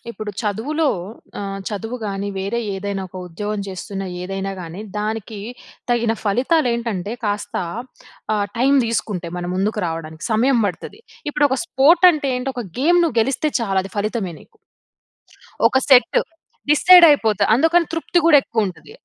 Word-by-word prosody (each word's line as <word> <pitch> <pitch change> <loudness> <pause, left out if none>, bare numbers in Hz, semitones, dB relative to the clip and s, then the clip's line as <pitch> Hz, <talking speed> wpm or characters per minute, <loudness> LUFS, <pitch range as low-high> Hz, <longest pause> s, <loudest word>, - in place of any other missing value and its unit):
ఇప్పుడు 215 -2 -6
చదువులో 255 +10 -1 0.5
ఆహ్, 195 -1 -4
చదువు 225 +3 -5
గాని, 200 -1 -3
వేరే 200 +5 -2 0.2
ఏదైనా 195 0 -4
ఒక 180 - -35
ఉద్యోగం 205 +4 -4
చేస్తున్న 195 +1 -6 0.2
ఏదైనా 195 +1 -4
గానీ, 170 +3 -8 0.2
దానికి 215 0 -4 0.5
తగిన 235 -2 +2
ఫలితాలు 255 +8 +2
ఏంటంటే 225 -4 -3
కాస్త 205 0 -2 0.8
ఆహ్, 205 -1 0
టైమ్ 275 +3 +4
తీసుకుంటై 210 -6 -3
మన 175 - -4
ముందుకు 205 +3 -1
రావడానికి 165 0 -6
సమయం 240 +2 +3
పడుతది. 200 - -6 0.3
ఇప్పుడు 295 0 +3
ఒక 265 - -1
స్పోర్ట్ 335 +4 +4
అంటే 295 -4 -2
ఏంటి 250 +2 -3
ఒక 245 -1 -4 0.2
గేమ్ 345 +5 +4
నువ్వు 320 -8 0
గెలిస్తే 275 +6 0
చాలు 195 -4 0
అది 195 - -9
ఫలితమే 205 -3 -2
నీకు. 455 - -21 1.1
ఒక - - +2
సెట్ 255 -2 +6 0.5
డిసైడ్ 355 +3 +8
అయిపోతా 220 -7 +2
అందుకని 325 +5 +3
తృప్తి 330 +2 +1
కూడా 310 -3 +7
ఎక్కువ 220 -3 -1
ఉంటది. 160 -4 -14
220 Hz, 150 wpm, -20 LUFS, 195-270 Hz, 1.1 s, డిసైడ్